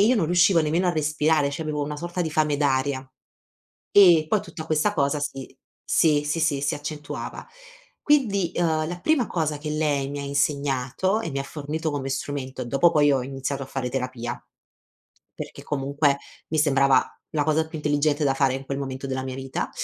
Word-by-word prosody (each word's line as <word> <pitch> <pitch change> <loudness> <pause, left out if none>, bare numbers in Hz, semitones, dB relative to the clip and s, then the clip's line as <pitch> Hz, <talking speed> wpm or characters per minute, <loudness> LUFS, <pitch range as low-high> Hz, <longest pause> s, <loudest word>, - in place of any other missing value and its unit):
io 250 +1 +4
non 190 - +2
riuscivo 175 0 +4
nemmeno 165 +4 +1
a - - +2
respirare, 150 -1 +1
c'avevo 150 0 -3
una 150 +1 -5
sorta 175 +3 -4
di 160 - -1
fame 150 -1 +1
d'aria. 135 -1 0 0.8
E 175 -6 +7
poi 210 +4 +2
tutta 155 -2 -8
questa 160 +6 +1
cosa 140 -3 +1
si 135 -2 -5 0.3
sì, 150 -3 +3
sì, 150 +3 -1 0.2
si 140 - 0
accentuava. 150 0 -6 0.6
Quindi, 205 - +2
ehm, 160 -2 +1
la 175 +1 -5
prima 310 -7 +2
cosa 155 -3 -1
che 150 +1 -6
lei 150 -3 0
mi 145 0 -5
ha - - -4
insegnato 140 - 0
e 165 - -4
mi 140 - -2
ha - - -2
fornito 155 +3 -4
come 135 -2 -3
strumento 130 -1 -4
dopo 140 +8 +3
poi 145 -3 +4
ho 130 -2 0
iniziato 135 +1 -4
a - - -9
fare 130 -2 -3
terapia, 125 -2 -4 0.9
perché - - -8
comunque 140 0 +1 0.3
mi 155 - -1
sembrava 140 -3 +4 0.3
la 150 -2 +1
cosa 160 +1 +1
più 160 - -7
intelligente 150 0 +1
da 135 - +3
fare 135 -1 +2
in 135 +1 -7
quel 135 0 -3
momento 135 0 -5
della 130 0 -2
mia 130 -1 -5
vita, 135 0 -4
145 Hz, 185 wpm, -24 LUFS, 135-160 Hz, 0.9 s, E